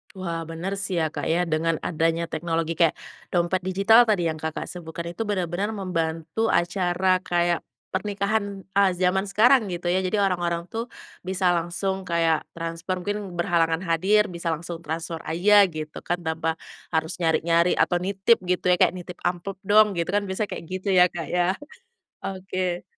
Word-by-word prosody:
Wah, 170 -3 -4
bener 170 +4 -4
sih 195 -2 -2
ya 155 - -1
Kak - - -4
ya, 175 +1 +2
dengan 165 0 0
adanya 165 0 0
teknologi 165 0 -1
kayak 165 -2 +4 0.4
dompet 175 +1 +2
digital 220 +5 +5
tadi 200 -5 +2
yang 155 -1 -4
Kakak, 160 0 -3
sebutkan 170 -1 -6
itu 220 +5 -4
benar-benar 195 +2 -1
membantu 165 +2 -2
acara 180 0 +2
kayak 175 -1 +1 0.3
pernikahan, 200 0 -2
eee, 200 -1 +5
zaman 185 +2 +1
sekarang 225 +3 +4
gitu 175 0 -4
ya, 185 - +2
jadi 205 +2 +1
orang-orang 175 -2 0
tuh 230 +2 -3 0.4
bisa 185 -1 +1
langsung 180 +3 -2
kayak 165 -2 +2
transfer, 165 +2 -4
mungkin 205 0 -4
berhalangan 170 -1 +1
hadir, 190 +5 +3
bisa 170 0 -6
langsung 165 +1 -6
transfer 165 +1 -4
aja 200 +5 +5
gitu 155 -2 -7
kan, 175 +1 0
tanpa 160 0 -1 0.4
harus 160 0 0
nyari-nyari 170 +1 +2
atau 175 - +2
nitip 195 +4 +3
gitu 180 0 0
ya, - - +6
kayak, - - +4
"Nitip 180 0 -8
amplop 185 +2 -3
dong," 210 -1 +5
gitu 170 - 0
kan 205 0 +2
biasanya 190 +2 -2
kayak 165 - -6
gitu 185 +2 -4
ya - - +9
Kak, 170 -2 -5
ya. 175 -1 +3 0.8
Oke. 185 -2 -3
175 Hz, 165 wpm, -25 LUFS, 165-195 Hz, 0.8 s, ya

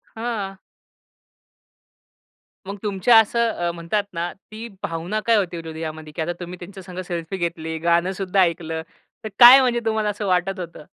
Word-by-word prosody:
हां. 215 -4 -4 2.1
मग 200 +1 -5
तुमच्या 210 +3 +4
असं 235 +2 +2
अ, 175 -3 -2
म्हणतात 170 +5 -2
ना, 170 +1 -3
ती 215 +3 -10 0.2
भावना 170 +5 -3
काय 230 - +4
होती 180 -4 -1
हृदयामध्ये 160 -1 -7
की 165 - -3
आता 175 +2 -2
तुम्ही 180 0 -7
त्यांच्या 190 +2 -10
संग 180 0 -8
सेल्फी 170 +1 -4
घेतली, 165 -2 -3
गाणं 170 +2 +2
सुद्धा 190 0 0
ऐकलं, 165 -2 0 0.4
तर 220 - -4
काय, 250 +2 +11
म्हणजे 245 -2 +1
तुम्हाला 220 -1 0
असं 205 0 -4
वाटत 185 +1 0
होतं? 170 -3 -8
180 Hz, 160 wpm, -22 LUFS, 170-210 Hz, 2.1 s, काय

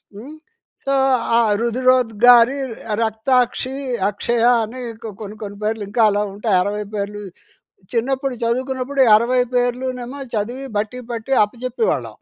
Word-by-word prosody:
హ్మ్. 265 +9 -10 0.5
సో, 275 - 0 0.4
ఆ - - +5 0.2
రుదరోద్గారి, 245 0 +4 0.5
రక్తాక్షి, 245 +3 0 0.3
అక్షయ 230 +3 -1 0.2
అని 245 +4 -7 0.2
కొ 225 - -5
కొన్ని, 210 0 -7
కొన్ని 205 0 -7
పేర్లు 215 0 -1
ఇంకా 230 +3 0
అలా 205 - 0
ఉంటాయి 205 -1 +1
60 210 +2 -3
పేర్లు 205 0 -4 0.7
చిన్నప్పుడు 265 +3 -1
చదువుకున్నప్పుడు, 260 +3 -2
ఈ - - +5
60 250 +2 +1
పేర్లు 245 +1 0
నేమో 255 +4 -7
చదివి 240 +6 -3
బట్టి 220 +4 -3
పట్టి 230 +3 -3
అప్పజెప్పేవాళ్ళం. 250 - -2
240 Hz, 130 wpm, -20 LUFS, 215-255 Hz, 0.7 s, ఆ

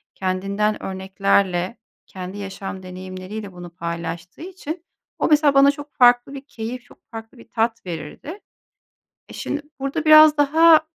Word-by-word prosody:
kendinden 195 +3 -1
örneklerle, 190 0 0 0.3
kendi 185 +1 -8
yaşam 195 -1 -7
deneyimleriyle 185 +3 -8
bunu 175 0 -9
paylaştığı 170 - -6
için 345 -2 -7 0.3
o - - +2
mesela 300 -2 +4
bana 275 +1 +6
çok 290 0 -11
farklı 245 0 +4
bir 275 - -7
keyif, 240 -1 -6
çok - - -22
farklı 225 +2 -9
bir 235 - -16
tat 230 -1 -1
verirdi. 175 - -7 0.9
E, - - -12
şimdi, 295 - -4 0.2
burada 275 +3 -2
biraz 310 -1 +8
daha 315 +2 +6
220 Hz, 135 wpm, -22 LUFS, 185-285 Hz, 0.9 s, biraz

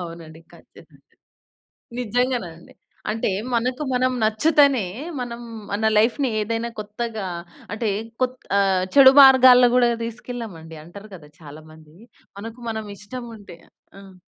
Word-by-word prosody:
అవునండి 165 -2 -10
ఖచ్చితంగా! - - -20 1.0
నిజంగానండి. 240 -8 -3 0.4
అంటే 220 -1 -2 0.2
మనకు, 250 +4 -1
మనం 255 +1 +1
నచ్చితేనే 275 +2 +3 0.4
మనం 240 -1 -6 0.3
మన 215 +2 -1
లైఫ్‌ని 245 +4 +2
ఏదైనా 230 +2 -3
కొత్తగా 215 0 -5 0.5
అంటే 220 0 -2 0.3
కొత్ 255 0 -1 0.2
అహ్! 190 -2 +2
చెడు 265 -1 +9
మార్గాల్లో 255 -2 +7
కూడా 245 -1 +4 0.2
తీసుకెళ్ళమండి 220 -9 -8
అంటారు 200 +6 -13
గదా! 150 -4 -15
చాలా 155 0 -12
మంది 155 0 -18 0.4
మనకు, 225 +3 -9
మనం 220 -1 -5
ఇష్టం 240 +4 -9
ఉంటే 185 -4 -14 0.4
ఆహ్, 195 -1 -15
225 Hz, 120 wpm, -22 LUFS, 190-250 Hz, 1.0 s, చెడు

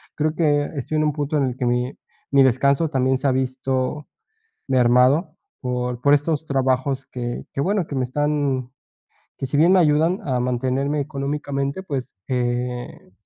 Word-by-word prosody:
creo 155 0 0
que 145 -3 +1
estoy 145 +3 -2
en 155 - +2
un 150 - +1
punto 150 +1 -1
en 140 - +2
el 125 -1 -2
que 125 - -1
mi 125 +2 0 0.4
mi 140 -1 +6
descanso 140 +5 +3
también 130 -2 +1
se 140 - -6
ha - - +4
visto 130 +2 -1 0.6
mermado, 130 +6 +3 0.2
por 125 -1 -2
por 145 0 +6
estos 150 +1 0
trabajos 130 0 0
que 120 -1 -5
que, 140 - -3
bueno, 190 +2 0
que 145 - -7
me 130 - +1
están, 140 -2 -1 0.7
que 135 - -3
si 145 - -1
bien 170 +4 +5
me 185 - +6
ayudan 160 +3 +3
a 125 -2 +1
mantenerme 130 +4 0
económicamente, 140 +2 -3
pues, 135 - -5
eh 125 -4 -3
135 Hz, 170 wpm, -22 LUFS, 125-150 Hz, 0.7 s, mi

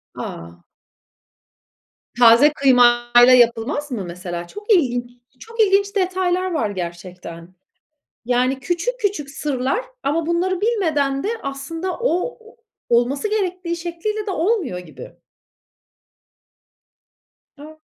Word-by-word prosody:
A! 85 +1 -8 1.6
Taze 245 +6 +7
kıymayla 245 -2 +5
yapılmaz 240 +5 +1
mı 215 -6 -3
mesela? 175 0 -6
Çok 415 +2 -6
ilginç. 245 -7 +1 0.3
Çok 460 0 -13
ilginç 400 0 +3
detaylar 370 -1 0
var 230 -11 -1
gerçekten. 175 -1 -8 0.7
Yani, 255 +2 0
küçük 355 - -2
küçük 380 -9 -2
sırlar 285 - -2 0.2
ama 310 +3 -1
bunları 355 +2 0
bilmeden 310 -12 0
de 410 - -2
aslında 325 +7 -5
o 475 +1 -1
o 455 +2 -18 0.3
olması 255 - +1
gerektiği 365 -4 -2
şekliyle 355 +6 -4
de - - -2
olmuyor 355 - -1
gibi. 180 -3 -11 2.5
A! 310 +2 -12
295 Hz, 105 wpm, -20 LUFS, 240-370 Hz, 2.5 s, Taze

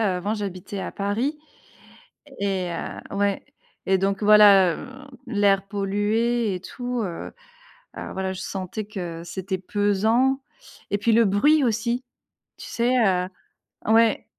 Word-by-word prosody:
avant 195 +4 -2
j'habitais 200 -2 -5
à - - -4
Paris. 220 +9 -1 1.0
Et 190 -3 -1
heu 170 - -6
ouais, 200 -1 0 0.4
et 190 - +3
donc 195 +2 0
voilà, 205 -4 +7
heu, - - -8 0.4
l'air 200 -3 +2
pollué 210 +2 0
et 180 - -6
tout, 245 +3 -4
heu, 175 -4 -6 0.6
alors - - -7
voilà, 190 0 -2
je 185 - -7
sentais 195 +2 -5
que 175 -6 -6
c'était 190 +1 -4
pesant. 215 +7 +1 0.5
Et 205 - +2
puis, 225 +3 +2
le 230 +1 +5
bruit 285 +10 +4
aussi. 235 +1 0 0.5
Tu - - -9
sais? 240 +2 0
Heu. 180 -3 +2 0.6
Ouais. 225 0 +4
205 Hz, 135 wpm, -24 LUFS, 190-230 Hz, 1.0 s, voilà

